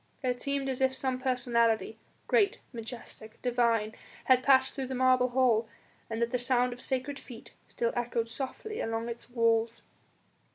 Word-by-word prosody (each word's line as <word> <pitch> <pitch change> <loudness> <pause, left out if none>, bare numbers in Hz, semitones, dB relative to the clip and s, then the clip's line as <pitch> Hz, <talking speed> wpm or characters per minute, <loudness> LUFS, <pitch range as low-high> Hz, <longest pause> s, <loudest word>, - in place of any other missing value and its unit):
It 250 -1 -1
seemed 280 -1 -1
as 265 -1 -2
if 260 0 +2
some 260 -1 -2
personality 235 -4 +1 0.3
great, 445 -1 +3 0.2
majestic, 225 -1 -9
divine 235 -3 +1 0.3
had 255 -1 +5
passed 265 -1 +4
through 270 -2 -4
the 260 - -4
marble 255 0 +4
hall 240 -3 +2 0.4
and 225 0 -3
that 235 - -1
the 250 - 0
sound 250 0 +2
of 245 - -11
sacred 265 +2 -2
feet 235 -3 -12 0.2
still 235 -1 -1
echoed 235 -1 -1
softly 275 - -5
along 225 +1 -2
its 235 0 -8
walls. 230 -1 +1
245 Hz, 160 wpm, -30 LUFS, 230-260 Hz, 0.4 s, had